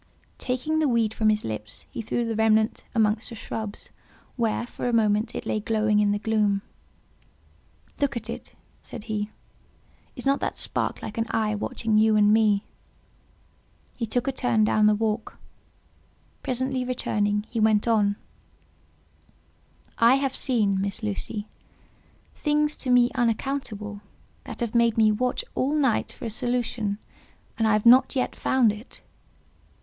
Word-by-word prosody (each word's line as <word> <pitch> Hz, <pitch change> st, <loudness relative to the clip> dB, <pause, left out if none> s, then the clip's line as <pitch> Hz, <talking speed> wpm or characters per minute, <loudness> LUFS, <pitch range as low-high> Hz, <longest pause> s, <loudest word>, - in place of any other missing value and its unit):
Taking 260 Hz, +5 st, -1 dB
the 310 Hz, -, +2 dB
weed 230 Hz, -4 st, +1 dB
from 220 Hz, -1 st, +2 dB
his 215 Hz, 0 st, +1 dB
lips, 105 Hz, -1 st, -6 dB
he 235 Hz, -, -4 dB
threw 235 Hz, +2 st, -1 dB
the 225 Hz, -1 st, -2 dB
remnant 220 Hz, 0 st, +2 dB
amongst 220 Hz, 0 st, +2 dB
the 235 Hz, -, -8 dB
shrubs, 215 Hz, -1 st, -6 dB, 0.5 s
where, 235 Hz, -1 st, 0 dB
for 245 Hz, -, -4 dB
a -, -, -2 dB
moment, 215 Hz, 0 st, +2 dB
it -, -, -5 dB
lay 215 Hz, -, -1 dB
glowing 215 Hz, 0 st, +1 dB
in 205 Hz, -1 st, +3 dB
the 205 Hz, -, +1 dB
gloom. 205 Hz, -2 st, +1 dB, 1.4 s
"Look, 280 Hz, -4 st, 0 dB
at 225 Hz, -1 st, -6 dB
it," 230 Hz, -, -8 dB, 0.3 s
said 235 Hz, -, -9 dB
he: 215 Hz, -2 st, -3 dB, 0.9 s
"is 250 Hz, -, -5 dB
not 275 Hz, +1 st, +3 dB
that -, -, -3 dB
spark -, -, -2 dB
like 220 Hz, +1 st, -5 dB
an 225 Hz, -, 0 dB
eye 215 Hz, -1 st, 0 dB
watching 215 Hz, +1 st, 0 dB
you 220 Hz, 0 st, +4 dB
and 210 Hz, 0 st, +5 dB
me?" 215 Hz, -2 st, +3 dB, 1.3 s
He 230 Hz, -, -3 dB
took 245 Hz, +4 st, -1 dB
a -, -, +2 dB
turn 245 Hz, -4 st, +1 dB
down 215 Hz, 0 st, +4 dB
the 210 Hz, -, +4 dB
walk; 220 Hz, +1 st, -2 dB, 1.0 s
presently 260 Hz, +1 st, -1 dB
returning, 210 Hz, -4 st, 0 dB
he 230 Hz, -, -3 dB
went 215 Hz, 0 st, +3 dB
on:—"I 225 Hz, +2 st, -3 dB
have 270 Hz, -1 st, -1 dB
seen, 210 Hz, -7 st, +1 dB
Miss 200 Hz, +3 st, -3 dB
Lucy, 210 Hz, 0 st, -3 dB, 0.9 s
things 300 Hz, 0 st, 0 dB
to 260 Hz, -, -5 dB
me 245 Hz, -1 st, +5 dB
unaccountable, 230 Hz, -4 st, -2 dB, 0.4 s
that -, -, -8 dB
have 235 Hz, -2 st, -2 dB
made 235 Hz, -1 st, +3 dB
me 215 Hz, -1 st, +5 dB
watch 250 Hz, +4 st, -1 dB
all 275 Hz, +4 st, 0 dB
night 270 Hz, -7 st, +1 dB
for -, -, -9 dB
a 225 Hz, -, -3 dB
solution, 235 Hz, -3 st, -1 dB, 0.6 s
and 225 Hz, -, +3 dB
I 220 Hz, -, +3 dB
have 215 Hz, +1 st, +1 dB
not 255 Hz, +4 st, +6 dB
yet 255 Hz, -, -1 dB
found 250 Hz, -5 st, +3 dB
it." 215 Hz, +4 st, -11 dB
225 Hz, 155 wpm, -25 LUFS, 210-245 Hz, 1.4 s, not